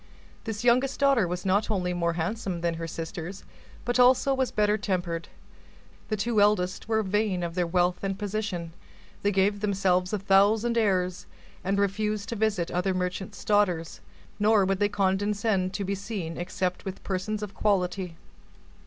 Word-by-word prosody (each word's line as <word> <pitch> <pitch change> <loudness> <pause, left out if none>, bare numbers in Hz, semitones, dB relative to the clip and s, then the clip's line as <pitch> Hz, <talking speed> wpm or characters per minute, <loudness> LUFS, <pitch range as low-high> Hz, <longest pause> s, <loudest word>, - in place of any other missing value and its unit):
This 220 -1 -4
youngest 255 +3 +3
daughter 275 -8 +4
was 180 +2 -4
not 200 +3 +2
only 180 -4 0
more 170 -1 0
handsome 180 +1 -3
than 170 0 0
her 165 0 -5
sisters, 165 +3 -6 0.4
but 245 +1 0
also 255 +2 +5
was 265 -1 0
better 210 0 +2
tempered. 175 -5 -2 0.8
The 215 - 0
two 215 +1 +1
eldest 205 -3 +2
were 220 -1 +1
vain 200 -2 0
of 170 -1 -3
their 175 -1 0
wealth 180 +1 +1
and 195 -1 -1
position. 205 -5 -3 0.5
They 205 - +2
gave 200 +1 +2
themselves 190 -3 +1
a 210 - 0
thousand 205 +4 +3
airs, 185 -5 +1 0.4
and 195 +2 0
refused 210 +1 0
to 235 - -2
visit 210 -5 0
other 180 +2 0
merchants' 185 +2 -4
daughters; 185 -6 +1 0.4
nor 210 -1 +4
would 195 0 0
they 205 0 +2
condescend 200 0 +1
to 200 - -2
be 195 - -1
seen 195 -4 -4
except 180 +1 -2
with 190 -1 -7
persons 205 +3 -2
of 205 -1 -6
quality. 185 -3 0
195 Hz, 160 wpm, -27 LUFS, 180-210 Hz, 0.8 s, also